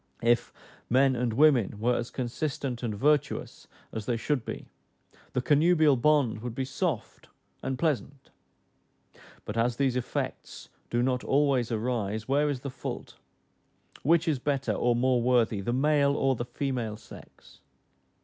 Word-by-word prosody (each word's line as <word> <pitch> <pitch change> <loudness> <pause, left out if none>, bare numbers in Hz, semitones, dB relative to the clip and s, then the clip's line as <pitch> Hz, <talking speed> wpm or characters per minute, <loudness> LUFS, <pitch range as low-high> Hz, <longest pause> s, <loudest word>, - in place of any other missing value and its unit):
If 120 0 +2 0.4
men 130 +2 +4
and 120 -1 0
women 125 -7 +3
were 120 +3 +2
as 120 0 -3
consistent 130 0 -3
and 110 -4 -3
virtuous 150 +5 0 0.2
as 110 -2 -6
they 120 -2 0
should 130 +1 -1
be, - - -6 0.7
the 125 - -1
connubial 155 0 +4
bond 130 -4 +2
would 120 -1 -5
be 130 - -2
soft 135 - -3 0.3
and 130 0 -3
pleasant; 145 -3 -2 1.1
but 105 - -5
as 120 +1 +1
these 135 -1 +1
effects 125 -1 -4 0.2
do 120 0 +1
not 125 -1 0
always 135 -4 +2
arise, 110 -2 -2
where 145 +2 +2
is 135 -3 -3
the 140 - -5
fault? 130 - -7 0.8
Which 170 +3 +3
is 150 -5 +1
better, 135 0 -1
or 120 0 +1
more 125 0 +2
worthy, 115 -4 +2
the 110 - -2
male 140 +2 +2
or 135 -2 +2
the 120 - -4
female 120 -4 -3
sex? - - -15
125 Hz, 150 wpm, -28 LUFS, 120-140 Hz, 1.1 s, men